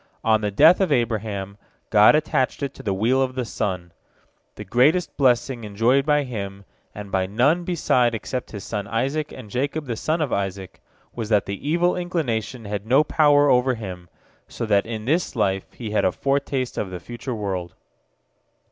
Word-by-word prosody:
On 110 Hz, -1 st, +3 dB
the 105 Hz, -, 0 dB
death 155 Hz, -, +5 dB
of 185 Hz, -5 st, +1 dB
Abraham, 105 Hz, -5 st, -1 dB, 0.3 s
God 105 Hz, +5 st, +7 dB
attached 150 Hz, -3 st, 0 dB
it 140 Hz, -1 st, -3 dB
to -, -, -11 dB
the 100 Hz, -, -2 dB
wheel 115 Hz, +7 st, +2 dB
of 130 Hz, -1 st, -1 dB
the 125 Hz, -2 st, -2 dB
sun. 90 Hz, -6 st, -3 dB, 0.6 s
The -, -, -8 dB
greatest 145 Hz, -, +2 dB
blessing 125 Hz, -2 st, +1 dB
enjoyed 115 Hz, +7 st, +1 dB
by 150 Hz, -1 st, +3 dB
him, 100 Hz, -6 st, -6 dB, 0.3 s
and 105 Hz, -1 st, -8 dB
by 95 Hz, -1 st, 0 dB
none 140 Hz, -, +2 dB
beside 125 Hz, -9 st, +1 dB
except 125 Hz, +3 st, -5 dB
his 100 Hz, -3 st, -8 dB
son 105 Hz, -2 st, -4 dB
Isaac 135 Hz, +7 st, -1 dB
and 130 Hz, -4 st, -10 dB
Jacob 145 Hz, +4 st, -2 dB
the 120 Hz, -3 st, -3 dB
son 155 Hz, +8 st, -1 dB
of 150 Hz, -5 st, -1 dB
Isaac, 95 Hz, -2 st, -4 dB, 0.3 s
was 115 Hz, -3 st, -5 dB
that 105 Hz, -3 st, +3 dB
the 100 Hz, +9 st, -5 dB
evil 175 Hz, +2 st, +2 dB
inclination 130 Hz, -, -3 dB
had 105 Hz, +1 st, -5 dB
no 135 Hz, +5 st, +5 dB
power 145 Hz, -1 st, +4 dB
over 125 Hz, -1 st, +3 dB
him, 90 Hz, -6 st, -8 dB, 0.4 s
so -, -, -5 dB
that 105 Hz, -1 st, +2 dB
in 110 Hz, -2 st, -5 dB
this 160 Hz, +3 st, 0 dB
life 95 Hz, -4 st, -1 dB
he 110 Hz, -4 st, -7 dB
had 105 Hz, -, +1 dB
a 95 Hz, -, +3 dB
foretaste 135 Hz, +1 st, -1 dB
of 100 Hz, -, -3 dB
the 90 Hz, -1 st, -6 dB
future 120 Hz, +3 st, -6 dB
world. 95 Hz, -5 st, -4 dB
120 Hz, 185 wpm, -23 LUFS, 100-140 Hz, 0.6 s, God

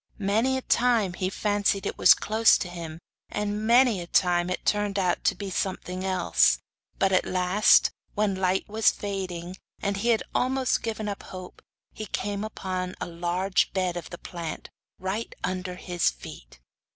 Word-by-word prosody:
Many 225 Hz, +6 st, +1 dB
time 230 Hz, -7 st, +2 dB
he 185 Hz, +1 st, -2 dB
fancied 205 Hz, -1 st, 0 dB
it -, -, -2 dB
was -, -, +8 dB
close 220 Hz, +1 st, +4 dB
to -, -, -4 dB
him, 170 Hz, -3 st, -7 dB, 0.3 s
and 210 Hz, +1 st, -2 dB
many 235 Hz, -5 st, +4 dB
times 175 Hz, -1 st, +2 dB
it 180 Hz, -, -4 dB
turned 205 Hz, -1 st, +1 dB
out 185 Hz, -2 st, 0 dB
to -, -, +3 dB
be 195 Hz, +1 st, -6 dB
something 185 Hz, -1 st, -3 dB
else; 185 Hz, -2 st, +3 dB, 0.4 s
but, 195 Hz, -, +2 dB
at 185 Hz, -, +3 dB
last, 185 Hz, +3 st, +4 dB, 0.2 s
when 210 Hz, -1 st, +1 dB
light 190 Hz, 0 st, 0 dB
was 220 Hz, +1 st, +3 dB
fading, 185 Hz, -3 st, -5 dB, 0.2 s
and 200 Hz, 0 st, -1 dB
he 230 Hz, +4 st, 0 dB
had 225 Hz, -2 st, +3 dB
almost 260 Hz, 0 st, +1 dB
given 220 Hz, -1 st, -3 dB
up 200 Hz, -1 st, -4 dB
hope, 185 Hz, -1 st, -10 dB, 0.3 s
he 215 Hz, -, -7 dB
came 200 Hz, +2 st, -3 dB
upon 185 Hz, -4 st, -4 dB
a -, -, -3 dB
large 175 Hz, +3 st, 0 dB
bed 185 Hz, -2 st, 0 dB
of 175 Hz, -2 st, -6 dB
the 175 Hz, -, -8 dB
plant, 170 Hz, -3 st, -7 dB, 0.3 s
right 190 Hz, +5 st, -4 dB
under 185 Hz, 0 st, -3 dB
his 175 Hz, -2 st, 0 dB
feet! -, -, -11 dB
190 Hz, 165 wpm, -26 LUFS, 180-210 Hz, 0.4 s, was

